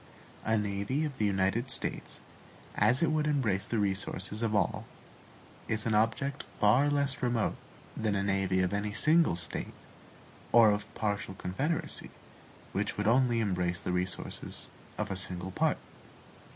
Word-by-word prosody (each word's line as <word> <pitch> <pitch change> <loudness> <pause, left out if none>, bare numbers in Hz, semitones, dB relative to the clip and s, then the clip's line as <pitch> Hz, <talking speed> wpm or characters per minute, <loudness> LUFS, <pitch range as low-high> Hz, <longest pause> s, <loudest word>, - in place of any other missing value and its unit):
A 110 0 +2
navy 105 +8 -1
of 140 -3 -6
the 105 - +2
United 100 +6 0
States, - - 0 0.5
as 130 +6 +3
it 160 - +3
would 155 -1 +1
embrace 110 -10 0
the 115 - -1
resources 100 0 -2
of 110 -2 0
all, 105 - 0 0.8
is 110 -1 -1
an 115 - +1
object 115 +6 +1 0.2
far 125 +8 +4
less 140 -1 +1
remote 120 -3 0 0.4
than 105 -2 0
a 100 - 0
navy 95 -1 +1
of 95 +1 0
any 105 0 -2
single 160 - +4
State 85 -1 -4 0.8
or 110 -3 +7 0.2
partial 100 -3 -2
confederacy, 135 - -2 0.6
which 105 +1 -2
would 105 - -1
only 120 +1 +3
embrace 90 -4 0
the - - -3
resources 90 0 -3 0.3
of 105 -2 -3
a - - -1
single 95 -1 0
part. - - +1
105 Hz, 145 wpm, -30 LUFS, 95-125 Hz, 0.8 s, or